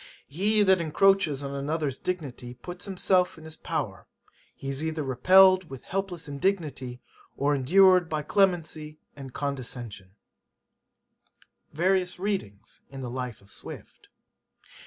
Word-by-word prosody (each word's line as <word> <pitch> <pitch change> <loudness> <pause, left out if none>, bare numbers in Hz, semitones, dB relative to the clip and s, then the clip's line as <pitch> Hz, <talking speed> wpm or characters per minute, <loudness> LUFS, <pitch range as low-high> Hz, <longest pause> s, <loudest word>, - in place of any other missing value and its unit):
He 205 +8 +2
that 190 -3 +4
encroaches 165 -3 +3
on 140 0 -5
another's 140 0 -2
dignity 135 -9 -5
puts 175 +8 -9
himself 185 -2 +1
in 160 - -13
his 160 0 -9
power; - - -4 0.5
he 135 - -9
is 135 +2 -3
either 160 -1 -2
repelled 185 +7 +5
with 135 -2 -9
helpless 190 -4 -4
indignity, 140 -5 -2 0.4
or 145 +1 +2
endured 180 +5 +5
by 155 -1 -2
clemency 160 -5 0 0.2
and 135 -2 -9
condescension.' 120 -9 -5 1.6
Various 180 +2 +1
Readings 185 - -4
in 135 -1 -8
the 125 -2 -5
Life 125 -3 -5
of 100 0 -20
Swift. - - -9
155 Hz, 125 wpm, -27 LUFS, 135-185 Hz, 1.6 s, repelled